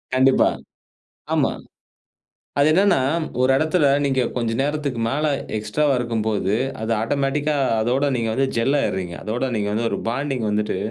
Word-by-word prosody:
கண்டிப்பா, 130 0 +4 0.8
ஆமா. - - +2 1.1
அது 145 - +5
என்னென்னா 190 -4 +4 0.4
ஒரு 130 +1 +4
இடத்துல 155 0 +2 0.2
நீங்க 135 -2 +1
கொஞ்ச 115 -2 -1
நேரத்துக்கு 145 -4 -2
மேல 150 +4 0 0.3
எக்ஸ்ட்ராவா 135 +7 0
இருக்கும்போது, 110 -4 -1 0.3
அது 110 - -2
ஆட்டோமேட்டிக்கா 140 +5 0 0.3
அதோட 125 +5 +1
நீங்க 115 -2 -1
வந்து 135 +2 +1
ஜெல் 135 +5 +2
ஆகிருறீங்க. 90 -2 -2
அதோட 120 +4 -2
நீங்க 105 -1 -1
வந்து 115 +1 0
ஒரு - - -2
பாண்டிங் 135 -2 -2
வந்துட்டு 105 -2 -1
130 Hz, 140 wpm, -22 LUFS, 110-145 Hz, 1.1 s, அது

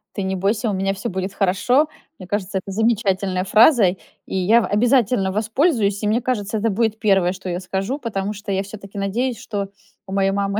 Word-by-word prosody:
"Ты 200 - -2
не 190 0 -1
бойся, 205 +4 0
у 205 - -1
меня 195 +1 0
всё 200 +5 -4
будет 190 +1 -4
хорошо". 230 +11 +2 0.3
Мне 185 - -10
кажется, 195 0 -2
это 195 +1 -9
замечательная 195 -4 +1
фраза, 220 +4 +5 0.4
и - - -6
я 215 +6 +4
в - - -1
обязательно 230 -2 +2
воспользуюсь, 215 - +1
и - - +1
мне 220 +4 +2
кажется, 220 -4 -2
это 220 +2 +1
будет 220 +1 0
первое, 195 -4 +3
что 190 -1 -7
я 175 - -2
скажу, 195 +9 -3
потому 205 -5 -3
что 205 0 -6
я 195 0 0
всё-таки 200 0 -10
надеюсь, 230 +5 -1
что 205 -3 -4 0.4
у 190 - -6
моей 195 0 +2
мамы 200 +1 -1
200 Hz, 205 wpm, -21 LUFS, 195-225 Hz, 0.4 s, фраза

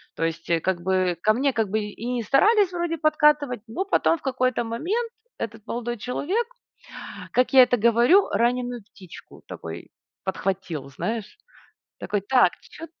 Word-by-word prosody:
То - - -3
есть, 165 0 -4
э, 165 -1 +2
как 180 0 -1
бы 185 -2 +1
ко 215 - +4
мне, 270 +4 +1
как 220 -3 0
бы, 220 +2 0
и 210 - -6
и - - -4
не 240 -2 -2
старались 395 - +4
вроде 345 -2 -2
подкатывать, 300 -5 +2
но 290 +12 -3
потом 335 -3 +2
в - - -21
какой-то 255 -2 0
момент 365 - -2 0.3
этот 225 0 -6
молодой 240 0 -3
человек, 350 - -2 0.9
как 250 +2 +2
я 265 - +9
это 245 0 +2
говорю, 235 - +4
раненую 245 0 0
птичку 190 -3 -14
такой - - -8 0.4
подхватил, 185 -7 -3
знаешь. 220 - -5 0.6
Такой: 205 -1 -1
"Так, 245 -3 +4
чё 325 - -11
240 Hz, 160 wpm, -24 LUFS, 205-295 Hz, 0.9 s, я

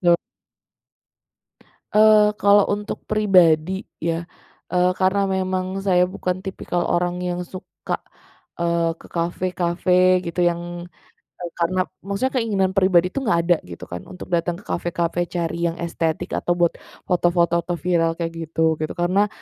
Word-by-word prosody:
Yap. 175 -1 +4 1.8
Eee, 215 0 +6
kalau 205 0 +6
untuk 205 +1 -4
pribadi 185 -4 +3 0.2
ya, 165 +1 -1 0.5
eee, 180 0 +3
karena 190 +2 +3
memang 185 0 -1 0.2
saya 180 -2 +4
bukan 185 0 -3
tipikal 175 -2 -3
orang 175 +1 0
yang 180 0 -2
suka, 185 +1 -6 0.6
eee, 170 -1 +1
ke - - -13
kafe-kafe 180 +1 +2
gitu, 170 +1 -3
yang, 170 0 -4 0.8
eee, 175 -1 -5
karena 185 +2 +1 0.2
maksudnya 200 +8 -2
keinginan 195 -4 +1
pribadi 185 -2 +4
itu - - -2
enggak 170 -7 +2
ada 175 - +5
gitu 85 - -9
kan, 90 - -5
untuk 180 - -9
datang 170 +1 -1
ke - - -16
kafe-kafe 175 0 -1 0.2
cari 170 -1 -1
yang 165 +1 -4
estetik, 170 0 -2
atau 175 - 0
buat 170 -1 +3 0.3
foto-foto 175 -1 +2
atau 175 - -2
viral 165 -2 +2
kayak 165 -1 -3
gitu, 160 0 -3 0.2
gitu. 155 - -2
Karena, 185 +4 +2
180 Hz, 140 wpm, -22 LUFS, 170-185 Hz, 1.8 s, Eee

